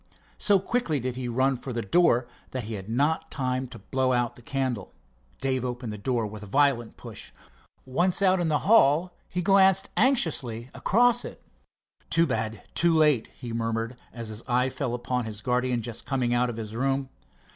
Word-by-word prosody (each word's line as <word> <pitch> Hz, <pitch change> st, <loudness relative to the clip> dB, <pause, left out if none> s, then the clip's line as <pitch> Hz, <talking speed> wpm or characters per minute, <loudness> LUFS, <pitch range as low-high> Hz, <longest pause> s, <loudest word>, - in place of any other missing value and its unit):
So 205 Hz, -1 st, +4 dB
quickly 190 Hz, -, -1 dB
did 125 Hz, 0 st, -3 dB
he 125 Hz, -1 st, -4 dB
run 130 Hz, +2 st, +1 dB
for 130 Hz, -, -7 dB
the 115 Hz, 0 st, -2 dB
door 125 Hz, -, +3 dB, 0.2 s
that 130 Hz, -2 st, -4 dB
he 110 Hz, +2 st, -6 dB
had 100 Hz, 0 st, -6 dB
not 145 Hz, +7 st, 0 dB
time 130 Hz, -1 st, -2 dB
to 120 Hz, -1 st, -10 dB
blow 130 Hz, +1 st, 0 dB
out 120 Hz, -1 st, 0 dB
the -, -, -15 dB
candle. 130 Hz, -5 st, -3 dB, 0.5 s
Dave 130 Hz, -1 st, 0 dB
opened 125 Hz, -3 st, -4 dB
the -, -, -6 dB
door 120 Hz, +1 st, 0 dB
with 105 Hz, 0 st, -7 dB
a 105 Hz, -, -9 dB
violent 130 Hz, -1 st, +1 dB
push. -, -, -8 dB, 0.5 s
Once 170 Hz, +8 st, +2 dB
out 190 Hz, -2 st, +4 dB
in 175 Hz, -, 0 dB
the 155 Hz, -2 st, +2 dB
hall 180 Hz, -5 st, +4 dB, 0.2 s
he 180 Hz, -, -2 dB
glanced 195 Hz, 0 st, +4 dB
anxiously 135 Hz, -, +1 dB
across 240 Hz, +2 st, +3 dB
it. -, -, -8 dB, 0.7 s
"Too 165 Hz, 0 st, +4 dB
bad—too 115 Hz, +7 st, 0 dB
late," 150 Hz, -7 st, +3 dB
he 120 Hz, -2 st, -6 dB
murmured, 115 Hz, +1 st, -2 dB
as 115 Hz, -2 st, -7 dB
his 110 Hz, +1 st, -6 dB
eye 125 Hz, +1 st, +2 dB
fell 125 Hz, -2 st, -3 dB
upon 125 Hz, 0 st, -2 dB
his 110 Hz, -1 st, -6 dB
guardian 125 Hz, -1 st, 0 dB
just 115 Hz, 0 st, -7 dB
coming 125 Hz, -3 st, 0 dB
out 125 Hz, 0 st, +2 dB
of 115 Hz, -, -5 dB
his 110 Hz, -1 st, -6 dB
room. 135 Hz, +2 st, 0 dB
130 Hz, 185 wpm, -26 LUFS, 115-155 Hz, 0.7 s, So